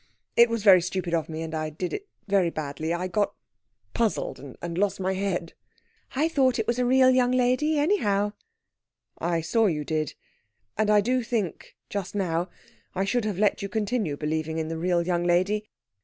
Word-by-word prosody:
It 235 0 +7
was 230 -2 -2
very 190 -4 +8
stupid 180 -1 -3
of 165 -1 0
me, 160 0 -4
and 160 0 -6
I 155 -1 -2
did 175 +4 -4
it 410 0 -5 0.2
very 195 -3 +3
badly. 155 0 -4
I 175 +2 -1
got 205 +2 0 0.6
puzzled, 230 -3 -1 0.2
and 170 -1 -5
lost 205 -1 +1
my 190 0 0
head." 185 -3 -2 0.6
"I 300 +4 +2
thought 270 -6 +2
it 225 - 0
was 235 +2 0
a 250 - +2
real 260 0 +6
young 250 -1 +3
lady, 255 +5 +2
anyhow." 210 - +1 0.9
"I 170 -1 0
saw 215 +8 +2
you 150 -5 -1
did. 155 -1 -2 0.6
And 215 -1 +1
I 210 -1 +5
do 250 +4 +1
think 225 -7 -3
just 200 -1 -4
now 175 -2 -1 0.5
I 190 +1 0
should 225 +3 0
have 205 -4 -2
let 205 0 +2
you 200 - -4
continue 210 -7 -1
believing 160 +1 -2
in 160 0 -2
the 165 - -3
real 175 0 +1
young 175 -1 0
lady 185 +5 +1
195 Hz, 185 wpm, -26 LUFS, 170-230 Hz, 0.9 s, very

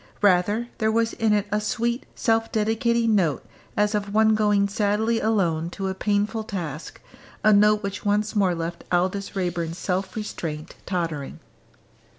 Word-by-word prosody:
Rather 205 +4 +3
there 220 0 +2
was 230 0 +1
in 225 -2 +1
it 210 -1 +2
a 210 0 +1
sweet 235 +4 -1
self 225 -1 +1
dedicating 225 +1 +1
note 170 -8 +1 0.3
as 210 +1 +2
of 205 -1 -2
one 220 0 +5
going 210 -2 +3
sadly 210 +2 +1
alone 170 -7 +1
to 190 +2 -4
a - - -2
painful 210 +3 0
task, 170 - -6 0.4
a 215 - +6
note 210 +1 +4
which 200 0 -4
once 210 +1 0
more 190 -4 +2
left 170 +1 -5
Aldous 185 +3 0
Raeburn's 175 -3 -2
self 185 +1 -2
restraint 160 -8 -5
tottering. 165 -7 -3
205 Hz, 155 wpm, -24 LUFS, 180-220 Hz, 0.4 s, a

